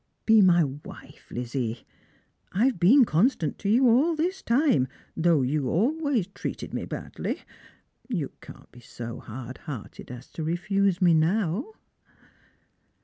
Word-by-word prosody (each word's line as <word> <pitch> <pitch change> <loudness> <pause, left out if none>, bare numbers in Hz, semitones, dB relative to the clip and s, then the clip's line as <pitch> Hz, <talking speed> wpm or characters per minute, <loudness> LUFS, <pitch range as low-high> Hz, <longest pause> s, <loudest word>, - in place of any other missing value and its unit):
Be 220 -1 +6
my 175 -3 +5
wife, 145 +1 -9
Lizzie. 120 -1 -4 0.7
I've 230 +1 +1
been 245 +10 +6
constant 170 - +1
to 200 - -2
you 250 +4 +5
all 280 +9 +4
this 365 +5 -1
time, 240 - +2 0.3
though 160 -4 +3
you 135 0 0
always 270 - +1
treated 195 - -6
me - - -3
badly. - - -5 0.7
You 170 - -2
can't - - -14
be 125 - -15
so 120 0 -8
hard 120 +2 -8
hearted 125 -8 -8
as 125 +1 -10
to 160 - -5
refuse 190 +3 0
me 175 -2 +6
now 185 - +1
175 Hz, 135 wpm, -26 LUFS, -, 0.7 s, Be